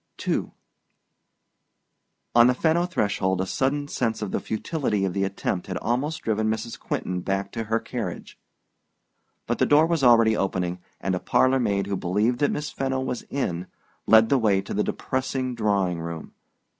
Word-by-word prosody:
II -, -, 0 dB, 1.8 s
On 120 Hz, 0 st, +7 dB
the 125 Hz, -, +3 dB
Fenno 165 Hz, +5 st, +2 dB
threshold 100 Hz, -, 0 dB
a 95 Hz, -, 0 dB
sudden 140 Hz, +7 st, -1 dB
sense 115 Hz, -6 st, -1 dB
of 105 Hz, -, -4 dB
the -, -, 0 dB
futility 110 Hz, -4 st, -1 dB
of 95 Hz, -, -2 dB
the 95 Hz, -, 0 dB
attempt 95 Hz, -2 st, -2 dB
had 95 Hz, -, -3 dB
almost 145 Hz, +8 st, -2 dB
driven 110 Hz, -1 st, 0 dB
Mrs. 110 Hz, +1 st, -3 dB
Quentin 90 Hz, 0 st, -3 dB
back 95 Hz, +1 st, -2 dB
to 115 Hz, -1 st, -4 dB
her 115 Hz, +1 st, +1 dB
carriage; -, -, -6 dB, 1.1 s
but -, -, -2 dB
the -, -, +3 dB
door 150 Hz, +2 st, +6 dB
was 165 Hz, -3 st, 0 dB
already 115 Hz, -3 st, +6 dB
opening, 90 Hz, -3 st, -1 dB, 0.2 s
and 95 Hz, -, -1 dB
a 90 Hz, -, 0 dB
parlor 130 Hz, +6 st, +3 dB
maid 100 Hz, -5 st, 0 dB
who 100 Hz, 0 st, -2 dB
believed 105 Hz, +7 st, 0 dB
that 145 Hz, -, +3 dB
Miss 150 Hz, 0 st, -3 dB
Fenno 135 Hz, -1 st, -1 dB
was 130 Hz, -2 st, -3 dB
in 90 Hz, -10 st, -2 dB, 0.4 s
led 110 Hz, 0 st, +6 dB
the 135 Hz, -, +4 dB
way 105 Hz, -4 st, +3 dB
to 95 Hz, -, -5 dB
the 105 Hz, -, +1 dB
depressing 130 Hz, -1 st, -2 dB
drawing 100 Hz, -6 st, 0 dB
room. 85 Hz, -1 st, -6 dB
110 Hz, 170 wpm, -25 LUFS, 95-130 Hz, 1.8 s, On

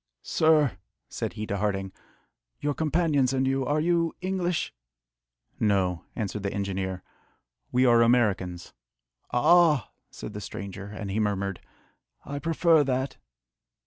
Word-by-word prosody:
"Sir," 150 Hz, -, +3 dB, 0.3 s
said -, -, -4 dB
he 110 Hz, -, -4 dB
to 100 Hz, -, -2 dB
Harding, 95 Hz, -2 st, -1 dB, 0.7 s
"your 145 Hz, 0 st, 0 dB
companions 150 Hz, -4 st, +1 dB
and 130 Hz, 0 st, +1 dB
you, 135 Hz, 0 st, +1 dB
are 145 Hz, +3 st, +1 dB
you 165 Hz, 0 st, +1 dB
English?" 180 Hz, -2 st, -1 dB, 0.9 s
"No," 95 Hz, -5 st, +1 dB
answered 105 Hz, -2 st, -3 dB
the 100 Hz, 0 st, -2 dB
engineer, 95 Hz, -2 st, -3 dB, 0.7 s
"we 125 Hz, +1 st, +3 dB
are 120 Hz, -1 st, +6 dB
Americans." 100 Hz, -7 st, +1 dB, 0.6 s
"Ah!" 155 Hz, -, +4 dB, 0.2 s
said 105 Hz, -, -8 dB
the 105 Hz, -, -6 dB
stranger, 100 Hz, -1 st, -7 dB
and 100 Hz, -1 st, -6 dB
he 105 Hz, -, -1 dB
murmured, 100 Hz, -3 st, -1 dB, 0.6 s
"I 140 Hz, +1 st, -4 dB
prefer 165 Hz, 0 st, +3 dB
that!" 130 Hz, 0 st, -2 dB
120 Hz, 125 wpm, -27 LUFS, 100-150 Hz, 0.9 s, are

